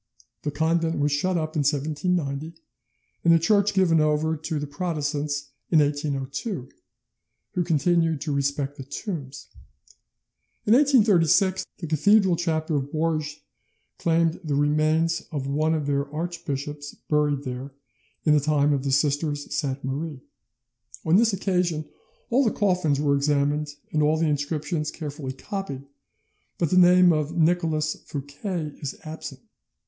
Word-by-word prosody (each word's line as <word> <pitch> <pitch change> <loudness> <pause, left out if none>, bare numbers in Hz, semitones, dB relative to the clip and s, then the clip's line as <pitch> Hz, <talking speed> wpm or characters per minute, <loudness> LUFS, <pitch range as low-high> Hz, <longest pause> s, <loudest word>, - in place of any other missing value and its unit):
The 150 - -2
convent 165 +2 0
was 145 0 +1
shut 175 +6 +1
up 155 0 -3
in - - +1
1790, 150 +2 -1 0.6
and 170 - +5
the 165 - +7
church 200 +4 +2
given 170 -4 +4
over 155 +1 +1
to 155 0 -4
the 145 - -3
Protestants 145 -2 -3 0.2
in 165 - +4
1802; 145 - -1 0.8
who 180 - +1
continued 165 0 +2
to 155 - -2
respect 140 0 -1
the 135 - -6
tombs. 140 - -6 1.2
In 215 - +4
1836 205 - +4
the 170 - -6
Cathedral 190 +4 +4
chapter 160 -2 -1
of 140 0 -4
Bourges 155 -1 -1 0.6
claimed 165 -1 +1
the 150 -3 -1
remains 155 +3 +2
of 140 -4 -3
one 155 +3 +1
of 150 -2 -2
their 140 0 -1
archbishops 145 -3 -5
buried 150 -2 +1
there 130 +1 -6 0.5
in 155 - +5
the 150 - +5
time 145 0 +2
of 135 -2 -1
the 140 - -1
Sisters 145 +1 +1
of - - -19
Sainte 140 -2 -2
Marie. 140 +1 -4 0.8
On 165 +3 +5
this 225 +1 +4
occasion 180 -5 -1 0.4
all 260 +4 +4
the 230 - +3
coffins 180 -9 +1
were 145 -1 +2
examined 145 +1 0 0.2
and 155 - +1
all 150 +1 +3
the 165 - +1
inscriptions 150 +1 -1
carefully 145 -4 -6
copied, 140 -3 -6 0.7
but 170 - 0
the - - +3
name 180 0 +6
of 155 +2 -2
Nicolas 160 -2 +1
Fouquet 150 +3 -5
is 140 - -4
absent. 155 -4 -8
155 Hz, 145 wpm, -25 LUFS, 145-170 Hz, 1.2 s, the